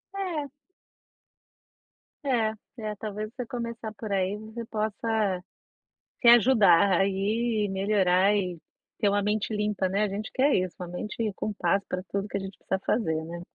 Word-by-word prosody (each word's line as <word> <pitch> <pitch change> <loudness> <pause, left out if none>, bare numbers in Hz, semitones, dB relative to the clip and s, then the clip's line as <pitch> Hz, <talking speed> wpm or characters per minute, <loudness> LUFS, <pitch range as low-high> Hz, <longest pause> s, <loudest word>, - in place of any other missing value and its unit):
É. 340 -8 -3 1.7
É. 235 -6 +1 0.2
É, 215 -2 -4
talvez, 215 0 -4
você 250 - -4
começar 235 -2 -5
por 215 -1 -7
aí, 195 +1 0
você 220 +2 -7
possa, 215 -3 -1 0.8
se 240 - +3
ajudar 205 -7 +6
aí 210 +3 +1
e - - -3
melhorar, 195 0 +3
e 180 -4 -1 0.4
ter 210 - +3
uma 205 0 +2
mente 210 +2 -1
limpa, 210 -2 0
né. 200 +3 +1
A - - +2
gente 205 +3 -5
quer 275 +2 +3
isso, 185 -1 -1
uma 180 - -5
mente 210 +5 -3
com 215 - -3
paz 195 0 +1
pra 180 0 -3
tudo 200 +1 -1
que 200 - -3
a - - -2
gente 195 0 -7
precisa 190 - -2
fazer, 160 -8 0
né. 170 +1 -7
210 Hz, 165 wpm, -27 LUFS, 195-225 Hz, 1.7 s, ajudar